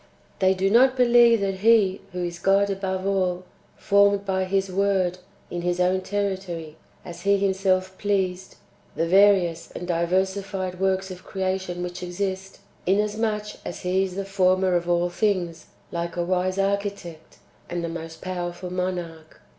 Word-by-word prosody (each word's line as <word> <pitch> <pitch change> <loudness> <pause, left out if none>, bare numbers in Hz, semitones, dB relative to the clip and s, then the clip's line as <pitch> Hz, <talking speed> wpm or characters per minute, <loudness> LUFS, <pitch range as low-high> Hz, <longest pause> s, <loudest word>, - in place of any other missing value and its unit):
They 190 0 +3
do 190 +1 +1
not 255 +3 +5
believe 240 -2 +5
that 195 -1 -2
He, 210 -3 +4
who 180 0 -4
is 170 0 -6
God 195 +2 +3
above 190 -1 -3
all, 185 -2 0 0.3
formed 200 0 +3
by 190 -1 0
His 195 0 0
word, 190 -2 +1 0.3
in 175 - -3
His 175 0 -1
own 185 +1 +2
territory, 190 -6 -3 0.3
as 170 0 -9
He 200 +1 +3
Himself 190 -1 0
pleased, 190 -2 -1 0.4
the 165 - 0
various 180 -3 +4
and 175 - -6
diversified 185 +2 -1
[works 190 0 0
of 185 0 -9
creation 185 -2 -3
which 180 0 -6
exist], 190 +2 -4 0.3
inasmuch 210 +2 -1
as - - -6
He 185 +1 +1
is 185 -2 -4
the 195 0 -3
former 185 -1 +2
of 175 0 0
all 175 0 +1
things, 180 -5 -1 0.2
like 170 0 -3
a 175 - 0
wise 185 +1 0
architect, 195 -5 -3 0.3
and 175 -1 -3
a - - -2
most 165 -1 -7
powerful 180 0 -4
monarch. 175 -3 -4
190 Hz, 155 wpm, -24 LUFS, 175-195 Hz, 0.4 s, not